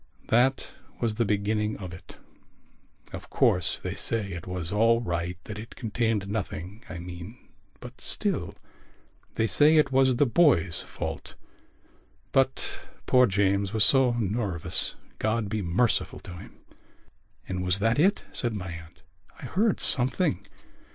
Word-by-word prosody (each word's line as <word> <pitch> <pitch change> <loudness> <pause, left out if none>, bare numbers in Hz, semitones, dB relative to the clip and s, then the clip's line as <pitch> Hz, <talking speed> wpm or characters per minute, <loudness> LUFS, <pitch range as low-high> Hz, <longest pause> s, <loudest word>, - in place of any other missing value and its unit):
That 125 +4 +2 0.3
was 115 -3 0
the 115 +2 0
beginning 105 +1 -1
of 90 -3 -8
it. 90 - -13 1.0
Of - - -8
course, 90 - +1
they - - -5
say 110 -4 -2
it 85 0 -7
was 90 -2 -4
all 115 +2 +3
right, 85 -4 -3
that 105 -1 -8
it 115 - -10
contained 110 -3 -1
nothing, 100 0 -5
I 90 - -6
mean. 90 +5 -9 0.4
But - - -12
still.... - - -2 0.8
They 110 - +1
say 145 - +5
it 150 -3 +3
was 130 -1 +3
the 145 - +3
boy's 115 - +3
fault. - - -7 1.0
But 135 0 +1 0.4
poor 125 -1 +5
James 100 0 0
was 110 -1 +5
so 130 -3 +4
nervous, 105 -6 0 0.2
God 110 -1 -1
be 110 0 -2
merciful 100 +7 0
to 90 - -10
him!" 85 - -12 0.9
"And 90 -1 -3
was 90 0 +1
that 115 +6 +1
it?" 195 +6 +3
said 120 -3 -2
my 95 -3 -5
aunt. 80 -1 -12 0.4
"I - - -8
heard 210 +2 +1
something...." 125 - +3
105 Hz, 145 wpm, -26 LUFS, 90-120 Hz, 1.0 s, say